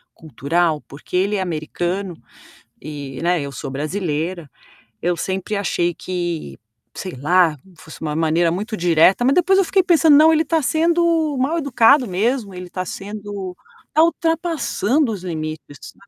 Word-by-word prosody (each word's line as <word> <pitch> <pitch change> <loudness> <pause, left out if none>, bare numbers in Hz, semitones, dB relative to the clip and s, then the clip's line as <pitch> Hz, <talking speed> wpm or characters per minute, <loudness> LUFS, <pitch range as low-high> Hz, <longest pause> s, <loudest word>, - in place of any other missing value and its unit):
cultural? 155 +3 -1
Porque 140 +5 -9
ele 200 +3 +1
é - - -1
americano, 175 +2 -3 0.7
e, 140 -3 -7
né, 175 -1 +2
eu 140 0 -5
sou 130 - -6
brasileira". 160 +1 -3 0.5
Eu 175 0 0
sempre 190 +2 -3
achei 175 -3 0
que, 175 -3 -4 0.4
sei 185 -2 -6
lá, 160 +2 +2 0.2
fosse 160 - -12
uma 150 -1 -3
maneira 165 +1 +2
muito 215 +5 -4
direta. 175 +6 +4
Mas 270 - +4
depois 380 +2 +4
eu 385 - +3
fiquei 385 +2 +3
pensando: 320 -4 +5
"Não, 315 +1 +7
ele 315 +1 +3
está 320 +1 0
sendo 330 0 +1
mal-educado 280 -3 +3
mesmo, 210 +2 -1
ele 180 0 -8
está 185 +1 -5
sendo 200 -1 -6 0.3
está 315 - +4
ultrapassando 325 - 0
os 185 -3 -7
limites", 155 -4 -6
sabe. 200 - -14
185 Hz, 150 wpm, -20 LUFS, 165-275 Hz, 0.7 s, Não